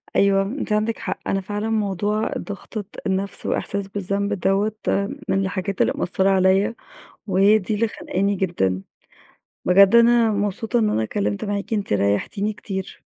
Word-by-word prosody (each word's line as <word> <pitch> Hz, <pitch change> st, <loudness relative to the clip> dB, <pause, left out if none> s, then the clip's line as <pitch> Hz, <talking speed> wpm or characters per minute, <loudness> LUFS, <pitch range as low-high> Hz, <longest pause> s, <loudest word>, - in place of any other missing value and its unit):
أيوه، 195 Hz, 0 st, +4 dB
أنتِ 225 Hz, +2 st, -4 dB
عندِك. 215 Hz, +2 st, 0 dB
حق -, -, -4 dB
أنا 195 Hz, 0 st, 0 dB
فعلًا 205 Hz, +2 st, -3 dB
موضوع 210 Hz, 0 st, 0 dB
ضغطة 205 Hz, 0 st, -6 dB, 0.2 s
النَفْس 195 Hz, +1 st, -2 dB
وإحساس 200 Hz, -1 st, -2 dB
بالذنب 200 Hz, +1 st, -2 dB
دوّة 195 Hz, +3 st, +1 dB, 0.6 s
من 190 Hz, -, +2 dB
الحاجات 190 Hz, 0 st, -2 dB
اللي -, -, +3 dB
مأثّرة 190 Hz, +2 st, +1 dB
عليّا 190 Hz, +3 st, +3 dB, 0.5 s
وهي 200 Hz, +2 st, +4 dB
دي 210 Hz, +2 st, -3 dB
اللي 230 Hz, +2 st, +1 dB
خانقاني 200 Hz, -1 st, -1 dB
جدًا. 95 Hz, -, -1 dB, 0.8 s
بجد 195 Hz, +4 st, +6 dB
أنا 235 Hz, -1 st, +5 dB
مبسوطة 210 Hz, +3 st, -1 dB
إن 215 Hz, -, +2 dB
أنا 110 Hz, -, 0 dB
اتكلِّمت 100 Hz, -1 st, -2 dB
معاكِ، 205 Hz, +2 st, -3 dB
أنتِ 205 Hz, -, -1 dB
ريَّحتيني 105 Hz, -, 0 dB
كتير. 190 Hz, -2 st, -6 dB
200 Hz, 145 wpm, -22 LUFS, 190-210 Hz, 0.8 s, بجد